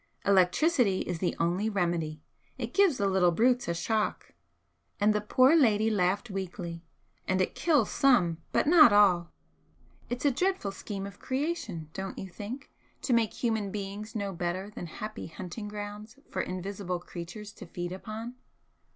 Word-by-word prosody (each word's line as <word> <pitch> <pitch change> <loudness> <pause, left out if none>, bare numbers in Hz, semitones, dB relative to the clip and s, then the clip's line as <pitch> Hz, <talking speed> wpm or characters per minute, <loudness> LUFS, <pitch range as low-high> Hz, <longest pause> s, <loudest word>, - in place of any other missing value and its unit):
Electricity 200 - +3
is 180 -2 -3
the 180 - 0
only 180 +6 +1
remedy. 170 -6 -1 0.3
It 240 -2 -5
gives 385 -9 +4
the 200 - 0
little 190 -2 +4
brutes 245 +7 +2
a 170 - -1
shock;" 215 +5 -1 0.7
and 210 +1 +4
the 210 - 0
poor 255 +8 +5
lady 220 -7 +4
laughed 200 +3 +1
weakly 175 -3 -5 0.4
"and 185 0 +1
it 185 - +1
kills 295 -10 +2
some, 185 -12 +3
but - - +2
not 310 -5 +8
all. 190 -4 +4 0.8
It's 245 +3 -3
a 285 - +5
dreadful 365 - 0
scheme 195 0 -6
of 200 0 -10
creation, 260 - -3
don't 190 0 -5
you 190 - -5
think, 220 +9 -8 0.3
to 255 - +1
make 230 -2 +2
human 220 -4 +1
beings 205 +2 -6
no 200 -2 -2
better 180 +3 -3
than 175 - -7
happy 215 +6 -6
hunting 185 +6 -7
grounds 210 +2 -7
for - - -1
invisible 185 0 -4
creatures 180 +5 -8
to - - -11
feed 175 +1 -5
upon?" 220 +5 -6
205 Hz, 160 wpm, -29 LUFS, 180-230 Hz, 0.8 s, not